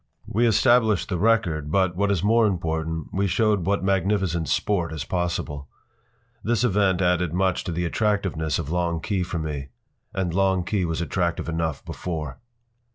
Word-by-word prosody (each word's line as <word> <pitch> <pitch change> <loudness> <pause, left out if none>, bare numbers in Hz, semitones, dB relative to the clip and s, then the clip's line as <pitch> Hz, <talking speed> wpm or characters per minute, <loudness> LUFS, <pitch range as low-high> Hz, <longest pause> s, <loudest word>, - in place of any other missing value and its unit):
We 120 +4 +1
established 115 -3 +3
the 90 - -1
record, 90 -9 +1
but, 95 -1 +2
what 100 +2 +1
is 100 -3 0
more 115 +1 +4
important, 80 -4 -2
we 100 +1 +1
showed 100 0 +1
what 100 -1 +1
magnificent 95 -4 +1
sport 85 +2 0
is 80 -3 -4
possible. 85 -5 -2 0.8
This 120 +1 +1
advent 95 -4 +2
added 90 -2 +1
much 95 0 +1
to - - -3
the 85 +1 -1
attractiveness 95 -5 0
of 80 -2 -4
Long 85 -1 0
Key 100 +2 -1
for 90 -1 -3
me. 75 -4 -4 0.4
And 90 -3 -2
Long 95 -1 +2
Key 95 0 0
was 80 0 -2
attractive 85 0 -1
enough 80 -3 -2
before. 80 -6 -5
90 Hz, 160 wpm, -24 LUFS, 80-100 Hz, 0.8 s, more